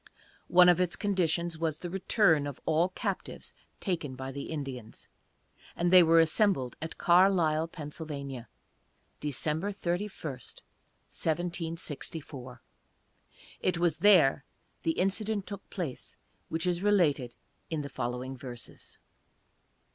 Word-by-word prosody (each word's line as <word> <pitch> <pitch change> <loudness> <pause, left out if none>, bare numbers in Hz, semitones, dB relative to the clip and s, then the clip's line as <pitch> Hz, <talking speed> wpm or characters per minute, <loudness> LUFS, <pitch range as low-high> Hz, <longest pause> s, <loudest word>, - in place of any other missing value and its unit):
One 180 0 +7
of 180 0 +5
its 180 -2 0
conditions 170 -4 0
was 160 -2 -1
the 175 - -6
return 185 -5 +3
of 140 - -7
all 165 +3 +2
captives 195 0 -5 0.3
taken 165 -9 -2
by 130 +1 -6
the 140 +1 -6
Indians, 135 -7 -6 0.7
and 175 +1 +1
they 185 - +11
were 165 0 +6
assembled 165 - +2
at 160 0 -5
Carlisle, 170 -3 +4
Pa., 160 -2 -8 1.3
December 150 +6 -1
31, 190 +1 -2 0.2
1764. 155 -2 -5 1.0
It 180 -2 0
was 170 -3 +1
there 170 -10 +5 0.4
the 165 - +1
incident 200 +2 0
took 200 -1 -8
place 170 -9 -5 0.3
which 160 +1 -2
is 175 -1 0
related 160 -12 +2 0.3
in 155 -3 -2
the - - -5
following 125 0 -4
verses. 125 -2 -10
165 Hz, 115 wpm, -30 LUFS, 145-180 Hz, 1.3 s, they